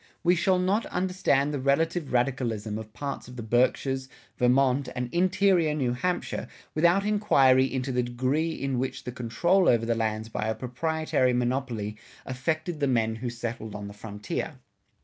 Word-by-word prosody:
We 175 +1 +5
shall 185 +2 +2
not 190 +5 +1
understand 180 -6 +1
the 145 - -1
relative 155 +4 +1
radicalism 120 -4 -1
of 110 -1 -9
parts 140 +3 -5
of 125 - -11
the 120 - -6
Berkshires, 130 +3 +1 0.3
Vermont 130 +2 +2
and 125 -1 -4
interior 180 -3 +3
New 130 -5 0
Hampshire 180 +8 -2 0.3
without 170 +5 +3
enquiry 135 -12 +4
into 130 0 -2
the 125 0 +1
degree 130 +6 0
in 135 -4 -2
which 130 +1 -3
the 125 - -5
control 170 +11 +2
over 115 -1 +3
the 115 - +1
lands 110 -1 -2
by 110 -1 -3
a 110 - 0
proprietary 130 +1 0
monopoly 120 -4 -1 0.3
affected 155 +5 -2
the 140 - +1
men 110 -3 +1
who 120 +2 -3
settled 115 -2 -5
on 105 -1 -6
the 100 - -9
frontier. 105 0 -5
130 Hz, 165 wpm, -27 LUFS, 120-160 Hz, 0.3 s, We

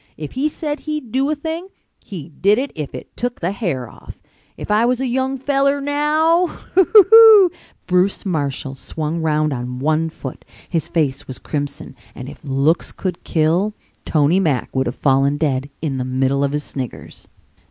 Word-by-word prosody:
If 150 -2 -6
he 275 +4 0
said 300 -1 -4
he'd 300 -7 -5
do 270 +3 +1
a 305 - +1
thing 320 +4 -5 0.4
he 175 -6 -8
did 200 +7 +2
it 275 +3 -2
if 150 -3 -6
it - - -10
tuck 245 0 -3
the 175 +2 -1
hair 170 - -3
off. - - -13 0.4
If - - -6
I 210 +2 +3
was 245 +1 +1
a 265 - -1
young 260 +2 -1
feller 275 +1 +1
now! 305 +5 +2
Hee - - -11 0.2
tee 380 - +6
tee - - -23
hee - - +12
e 395 +3 -2
e 445 -4 +9
e!" - - -25 0.3
Bruce 180 +3 +1
Marshall 145 -6 -2
swung 155 +4 -4
round 155 -1 +1
on 125 0 -5
one 155 +4 0
foot. 135 -4 -9 0.2
His 165 -4 -2
face 145 -5 -1
was 130 - -6
crimson 145 -2 -5 0.2
and 125 - -8
if 145 - -11
looks 140 +4 +1
could 180 -3 -5
kill, 170 +7 +1 0.3
Tony 155 +4 +2
Mack 150 -10 -1
would 130 0 +1
have - - -3
fallen 140 +1 +2
dead 140 -3 -1
in 135 -4 -2
the - - -1
middle 130 +2 0
of 140 - 0
his 150 0 -2
sniggers. 130 -4 -7
165 Hz, 195 wpm, -19 LUFS, -, 0.4 s, hee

